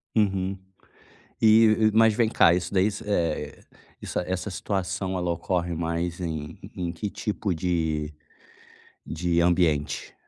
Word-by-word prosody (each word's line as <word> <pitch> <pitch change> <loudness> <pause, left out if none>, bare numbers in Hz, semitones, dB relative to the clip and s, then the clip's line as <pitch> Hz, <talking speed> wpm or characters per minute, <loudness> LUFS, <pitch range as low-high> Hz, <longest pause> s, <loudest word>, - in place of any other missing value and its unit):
Uhum. 95 -3 +1 0.8
E, 110 0 +5
mas 110 0 +5
vem 115 0 +2
cá, 85 -6 +5
isso 90 +1 -2
daí, 95 +1 +3 0.2
eh 90 -5 -1 0.4
iss - - -4
essa - - +2
essa 95 +3 -3
situação 95 0 -3
ela 90 -1 -1
ocorre 85 +1 -2
mais 85 +1 -2
em 80 -4 -5 0.2
em 85 -2 -3
que 95 +4 -4
tipo 100 -1 -3
de 80 -3 -1 0.9
de 85 +1 0
ambiente? 85 -4 +1
90 Hz, 130 wpm, -25 LUFS, 85-100 Hz, 0.9 s, E